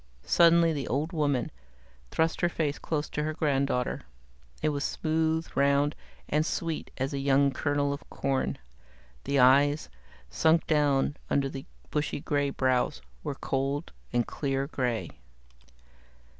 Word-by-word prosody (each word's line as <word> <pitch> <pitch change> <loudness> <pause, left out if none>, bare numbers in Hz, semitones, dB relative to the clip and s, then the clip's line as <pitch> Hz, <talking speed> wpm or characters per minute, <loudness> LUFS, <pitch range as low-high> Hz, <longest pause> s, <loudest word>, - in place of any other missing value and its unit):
Suddenly 170 -1 +5
the 140 -3 -3
old 145 +8 -1
woman 145 -6 0 0.6
thrust 160 0 0
her 175 - +3
face 150 -4 -2
close 150 -2 -2
to 150 - -2
her 155 +1 -2
granddaughter. 140 -5 0 0.6
It - - +3
was 145 -1 -2
smooth, 160 0 0
round, 140 +2 +3 0.3
and 150 +1 +2
sweet 165 -1 -3
as 135 +2 -2
a 140 - -2
young 140 0 +3
kernel 145 0 0
of 140 - -9
corn. 135 -1 -1 0.7
The 140 - 0
eyes, 140 +3 +5 0.4
sunk 160 - +3
down 145 -2 +2
under 140 -1 +1
the 135 0 -8 0.2
bushy 150 -1 -1
grey 145 0 0
brows, 130 - 0 0.2
were 140 - -3
cold 140 +4 -2 0.2
and 120 -1 +1
clear 135 -1 -2
grey. 125 -5 -2
145 Hz, 135 wpm, -28 LUFS, 135-155 Hz, 0.7 s, Suddenly